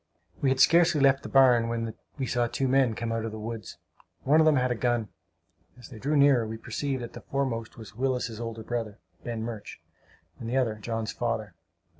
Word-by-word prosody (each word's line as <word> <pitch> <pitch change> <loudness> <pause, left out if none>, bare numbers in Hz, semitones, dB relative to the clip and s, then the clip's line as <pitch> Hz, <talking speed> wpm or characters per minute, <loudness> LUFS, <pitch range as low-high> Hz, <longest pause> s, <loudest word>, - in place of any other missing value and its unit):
We 135 - +3
had 130 0 +1
scarcely 165 -1 +5
left 135 -1 +4
the - - -8
barn 125 -4 +5
when 115 -1 -2 0.2
we 135 - -2
saw 120 -1 0
two 135 +3 -1
men 130 -3 +3
come 115 0 -3
out 115 -1 -1
of 115 - -3
the 110 - -7
woods. 110 -2 -6 0.5
One 150 +4 +4
of 160 - +5
them 155 - +5
had 125 -1 +1
a - - +3
gun. 120 -2 0 0.7
As 125 - -12
they 120 -5 -10
drew 145 +6 0
nearer, 140 -5 +5
we 110 +1 -5
perceived 130 +3 -3
that 120 - -8
the - - -9
foremost 125 -5 -3
was 110 -3 -11
Willis's 125 -2 -2
older 115 -1 -5
brother, 115 -3 -4 0.3
Ben 115 -2 -4
Murch, 115 -2 -7 0.6
and 115 - -5
the 130 - 0
other 125 -4 +2
John's 115 0 -3
father. - - -3
120 Hz, 210 wpm, -27 LUFS, 115-135 Hz, 0.7 s, scarcely